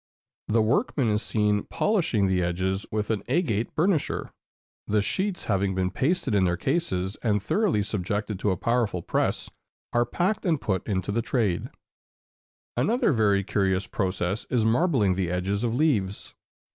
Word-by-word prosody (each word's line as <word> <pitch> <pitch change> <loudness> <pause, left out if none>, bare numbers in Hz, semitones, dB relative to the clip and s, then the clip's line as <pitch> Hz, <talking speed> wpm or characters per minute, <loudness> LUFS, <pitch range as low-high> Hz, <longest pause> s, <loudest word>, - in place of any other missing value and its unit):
The 110 +1 +3
workman 125 - +1
is 105 0 +1
seen 105 -2 +1
polishing 170 - +1
the 95 -1 +1
edges 95 +3 -1
with 105 0 -1
an 105 -3 -1
agate 125 - 0
burnisher. 165 -1 0 0.6
The 105 +1 +2
sheets 185 - -2
having 95 -2 0
been 95 0 0
pasted 135 - 0
in 100 -2 +3
their 90 -1 +1
cases, 95 - -1
and 105 -3 +2
thoroughly 160 - +1
subjected 105 0 -3
to 105 - 0
a 95 - 0
powerful 115 -5 0
press, - - -1 0.4
are 120 0 +2
packed 185 - 0
and 165 -6 +1
put 95 -7 -2
into 95 -2 -1
the 115 +3 0
trade. 110 -7 0 1.1
[Illustration: - - -24
Marbling.] 125 - +2
Another 240 -1 +2
very 105 -5 +2
curious 95 -1 0
process 95 0 -2
is 115 -3 +1
marbling 120 - +3
the 90 -2 -1
edges 95 +4 -1
of 115 -1 0
leaves. 110 -10 0
105 Hz, 160 wpm, -26 LUFS, 95-125 Hz, 1.1 s, The